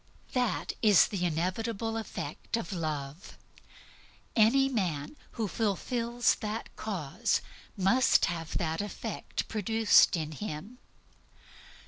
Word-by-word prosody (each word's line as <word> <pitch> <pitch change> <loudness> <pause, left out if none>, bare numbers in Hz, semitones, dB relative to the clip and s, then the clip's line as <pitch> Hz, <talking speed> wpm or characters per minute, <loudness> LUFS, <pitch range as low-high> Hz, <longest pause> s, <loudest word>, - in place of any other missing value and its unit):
That 250 -3 0
is 210 -5 +6
the 185 -4 -1
inevitable 205 +7 -2
effect 225 +1 -4
of 200 -4 -4
Love. 155 -1 -4 1.0
Any 240 +5 +5
man 185 - -2 0.2
who 225 -3 -2
fulfills 230 +4 0
that 215 +1 -5
cause 180 -10 -1 0.4
must 215 +7 +4
have 165 -2 -3
that 160 -1 -1
effect 205 - -4
produced 220 -2 +4
in 155 -1 -3
him. 205 +7 -6
205 Hz, 100 wpm, -30 LUFS, 170-225 Hz, 1.0 s, is